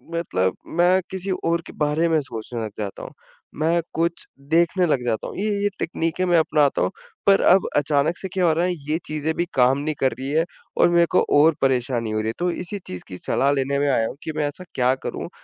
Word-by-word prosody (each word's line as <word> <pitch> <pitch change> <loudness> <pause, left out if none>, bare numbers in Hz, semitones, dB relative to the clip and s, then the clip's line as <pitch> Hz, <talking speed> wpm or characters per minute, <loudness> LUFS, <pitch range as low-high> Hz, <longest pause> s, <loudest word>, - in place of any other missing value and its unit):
मतलब 95 - 0 0.2
मैं 180 +2 +4
किसी 190 +1 -4 0.2
और 170 0 +1
के - - -10
बारे 150 +2 +1
में 160 -1 +3
सोचने 120 -2 -6
लग 110 - -5
जाता 100 -2 -5
हूँ। - - -8 0.5
मैं 170 +2 +2
कुछ 170 +1 -1 0.2
देखने 170 +3 +3
लग 135 -5 +1
जाता 115 -2 -1
हूँ। - - -8
ये 210 +2 -1
ये 205 - +3
टेकनीकें 165 +2 -1
मैं 175 -2 +3
अपनाता 150 -3 +2
हूँ, - - +1 0.4
पर 195 0 +6
अब 190 +1 +5
अचानक 145 +3 +1
से 190 - -5
क्या 185 -2 +1
हो 165 - +4
रहा 170 +3 +1
है, 180 - 0 0.2
ये 155 - +2
चीज़ें 155 +1 -2
भी 175 - 0
काम 130 +2 +4
नहीं 155 +1 -2
कर 130 -1 +2
रही 135 +1 -4
है 160 +2 +2 0.3
और - - +5
मेरे 170 0 +4
को - - +6 0.2
और 155 +2 +5
परेशानी 125 -3 0
हो 110 - -1
रही 110 - -2
है। - - -2
तो 175 0 +1
इसी 180 +4 -5
चीज़ 90 - -7
की 90 - -8
सलाह 135 +8 +1
लेने 140 0 0
में 145 0 +1
आया 115 -4 +2
हूँ - - -7
कि 160 - -3
मैं 150 - +1
ऐसा 145 +5 -7
क्या 125 0 +3
करूँ? - - -4
155 Hz, 235 wpm, -23 LUFS, 130-170 Hz, 0.5 s, पर